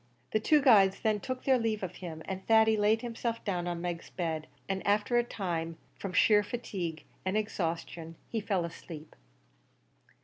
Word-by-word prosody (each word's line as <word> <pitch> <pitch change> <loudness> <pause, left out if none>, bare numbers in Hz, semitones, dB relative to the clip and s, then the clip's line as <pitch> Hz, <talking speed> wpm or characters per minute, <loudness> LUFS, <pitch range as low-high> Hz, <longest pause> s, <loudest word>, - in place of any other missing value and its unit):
The 215 - +2
two 295 +6 +4
guides 200 -7 +6
then 215 -1 +2
took 255 +4 -5
their 265 -2 +4
leave 220 -3 -1
of 185 - -5
him, 160 -3 -7
and 190 0 -5
Thady 220 0 +6
laid 215 +2 +2
himself 230 -1 -3
down 180 -4 -1
on 175 -1 -3
Meg's 175 -1 -4
bed, 160 -3 -3 0.2
and, 195 -1 -1
after 210 +4 +3
a - - +2
time, 165 -7 -3 0.2
from 195 - -6
sheer 210 +2 +5
fatigue 190 -7 -4 0.2
and 190 +3 0
exhaustion, 165 -5 -3
he 225 - -2
fell 195 -4 0
asleep. 165 -2 -9
195 Hz, 170 wpm, -31 LUFS, 170-220 Hz, 0.2 s, guides